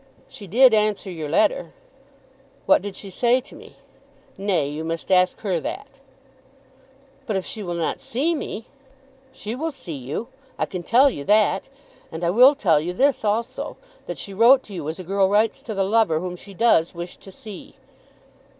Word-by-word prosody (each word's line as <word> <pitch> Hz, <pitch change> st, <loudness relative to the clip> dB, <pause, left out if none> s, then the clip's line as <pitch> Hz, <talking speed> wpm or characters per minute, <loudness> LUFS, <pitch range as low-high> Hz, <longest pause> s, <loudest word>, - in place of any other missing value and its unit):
"She 200 Hz, -, -11 dB
did 245 Hz, +6 st, +6 dB
answer 210 Hz, -2 st, +1 dB
your 160 Hz, -4 st, -5 dB
letter." -, -, +1 dB, 0.9 s
"What -, -, +5 dB
did 205 Hz, -1 st, -6 dB
she 195 Hz, -, -9 dB
say 240 Hz, +6 st, +2 dB
to 260 Hz, -, -15 dB
me?" -, -, -14 dB, 0.6 s
"Nay, 195 Hz, -7 st, 0 dB
you 150 Hz, +2 st, -5 dB
must 165 Hz, +3 st, -4 dB
ask 185 Hz, 0 st, +3 dB
her 190 Hz, -5 st, -1 dB
that." 270 Hz, -, -7 dB, 1.3 s
"But 215 Hz, -, -1 dB
if 190 Hz, -, -2 dB
she 220 Hz, -, -6 dB
will 175 Hz, -3 st, -4 dB
not 170 Hz, -1 st, -2 dB
see 290 Hz, +8 st, -1 dB
me?" 230 Hz, -7 st, -5 dB, 0.7 s
"She 220 Hz, -4 st, -6 dB
will 315 Hz, +6 st, -3 dB
see 180 Hz, -, -8 dB
you. 140 Hz, -, -5 dB, 0.3 s
I -, -, 0 dB
can 185 Hz, -, -6 dB
tell 255 Hz, +9 st, +4 dB
you 140 Hz, -, -6 dB
that. 205 Hz, -, +2 dB, 0.4 s
And 160 Hz, +2 st, -6 dB
I 170 Hz, -, +2 dB
will 255 Hz, +8 st, +7 dB
tell 175 Hz, -, +3 dB
you 170 Hz, +4 st, -3 dB
this 270 Hz, +5 st, +2 dB
also; 220 Hz, +2 st, -2 dB, 0.3 s
that -, -, -5 dB
she 200 Hz, -, -6 dB
wrote 240 Hz, +6 st, +6 dB
to 205 Hz, -, -12 dB
you 160 Hz, -5 st, -4 dB
as 160 Hz, -, -5 dB
a 185 Hz, -, -7 dB
girl 195 Hz, +2 st, +1 dB
writes 210 Hz, +3 st, +2 dB
to 220 Hz, -, -6 dB
the 195 Hz, -, +1 dB
lover 200 Hz, -5 st, +2 dB
whom 180 Hz, +1 st, -5 dB
she 195 Hz, +2 st, -13 dB
does 180 Hz, -7 st, +3 dB
wish 175 Hz, +1 st, -7 dB
to 195 Hz, -, -14 dB
see." 215 Hz, -4 st, -11 dB
200 Hz, 185 wpm, -23 LUFS, 175-230 Hz, 1.3 s, will